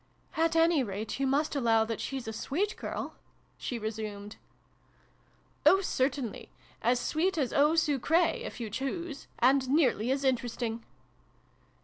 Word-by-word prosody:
" - - -38
At 330 0 +2
any 330 -2 +4
rate 215 +1 -4
you 275 - +1
must 290 +3 +1
allow 225 -4 +3
that 225 -1 -4
she's 265 -4 -4
a 220 - -3
sweet 355 - -1
girl? - - -5 0.2
" - - -38
she 245 - -3
resumed. 215 -2 -5 0.6
" - - -36
Oh, 385 - +6
certainly. 260 - -2 0.3
As 245 +2 +2
sweet 335 +7 0
as 270 -5 0
eau 295 +3 +4
sucrfa, 325 - +2
if - - -7
you 225 -3 -5
choose 280 - -4
and 260 +1 +4
nearly 260 -6 +2
as 270 +1 0
interesting 240 -3 -1
265 Hz, 150 wpm, -30 LUFS, 230-310 Hz, 0.6 s, Oh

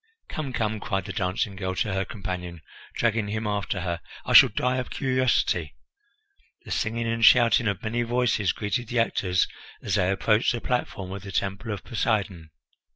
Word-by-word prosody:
"Come! 145 -4 -4
come!" 110 -3 -1
cried 95 -1 -2
the 95 - -5
dancing 100 0 -1
girl 95 -1 -3
to 105 +1 -1
her 95 0 -1
companion, 90 -5 -6 0.3
dragging 115 -2 +1
him 110 +2 -3
after 100 -2 -2
her, 85 -1 -3 0.2
"I - - -1
shall - - +10
die 125 0 0
of 130 - -3
curiosity." 130 - 0 0.9
The - - -9
singing 115 +1 -1
and 115 0 -1
shouting 115 0 +6
of 100 +3 -2
many 115 +2 -1
voices 120 -5 +1
greeted 115 +3 -3
the 120 - -3
actors 95 -5 +1 0.3
as - - -4
they 90 - +2
approached 105 +4 +2
the 120 - -2
platform 110 -6 -3
of 100 0 -6
the 95 0 -8
Temple 100 +4 -2
of 100 -3 -5
Poseidon. 100 -8 -1
105 Hz, 175 wpm, -26 LUFS, 95-115 Hz, 0.9 s, shall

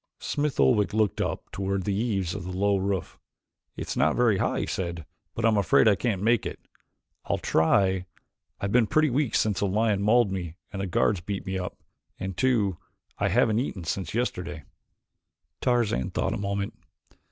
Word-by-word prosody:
Smith 150 -1 -2
Oldwick 100 +10 +3
looked 105 -5 +1
up - - -3
toward 95 0 -2
the 100 - -1
eaves 100 -5 -1
of 100 - -5
the 90 0 -5
low 100 +1 +3
roof. 95 -3 -2 0.6
"It's - - -4
not 80 +2 +2
very 115 -5 +3
high," - - 0
he - - -1
said, 85 -4 -4 0.3
"but 115 - -1
I - - +6
am 110 -2 +3
afraid 100 +3 +4
I 105 - +7
can't 100 -2 -1
make 115 0 +3
it. - - -5 0.7
I'll - - 0
try 95 +3 +2 0.5
I've 100 - -2
been 120 -1 +4
pretty 155 +4 +3
weak 135 -2 0
since 105 -3 +1
a 100 - +2
lion 105 0 +1
mauled 110 0 +4
me 90 -4 -4 0.2
and 95 - -3
the 100 - -2
guards 90 +1 +1
beat 100 +2 -4
me 95 0 -2
up, 90 - -6 0.4
and 95 0 -4
too, 105 -5 +1 0.4
I - - +2
haven't 110 0 +3
eaten 105 -8 -3
since 90 +3 -3
yesterday." 90 - -2 1.0
Tarzan 120 - +1
thought - - -1
a - - -2
moment. 100 0 -2
100 Hz, 185 wpm, -27 LUFS, 95-110 Hz, 1.0 s, I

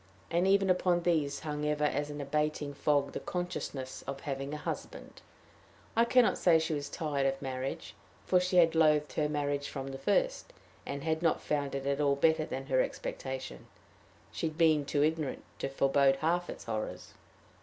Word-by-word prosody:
And 175 +2 +2
even 195 -1 +4
upon 180 -1 +2
these 150 -5 +1
hung 150 -1 -4
ever 150 0 0
as 145 0 0
an 145 0 -6
abating 150 0 -1
fog 140 0 +1
the - - -4
consciousness 150 -7 -4
of 140 0 -5
having 135 -1 -4
a 150 - -3
husband. - - -6 0.7
I 230 +1 +5
can 250 0 +5
not - - 0
say 170 -3 +5
she 160 0 -1
was 145 -1 -3
tired 145 -4 -1
of 135 0 -1
marriage, 130 -1 -4 0.3
for 180 - +4
she 180 0 0
had 165 -2 +6
loathed 150 -2 +3
her 150 -1 0
marriage 145 -1 -1
from 135 0 -5
the 135 0 -7
first, - - 0 0.3
and 140 0 -4
had 160 0 0
not 165 -2 +2
found 145 -2 -2
it 135 0 -4
at 140 +1 0
all 140 -1 +3
better 160 +2 +3
than 135 +1 -5
her 130 -2 +2
expectation: 130 -1 -5 0.6
she - - -2
had 155 0 -7
been 155 -3 +4
too 145 0 +1
ignorant 155 -2 -1 0.2
to - - -2
forebode 135 0 +3
half 170 +5 0
its - - -7
horrors. 110 -2 -5
150 Hz, 185 wpm, -31 LUFS, 140-165 Hz, 0.7 s, had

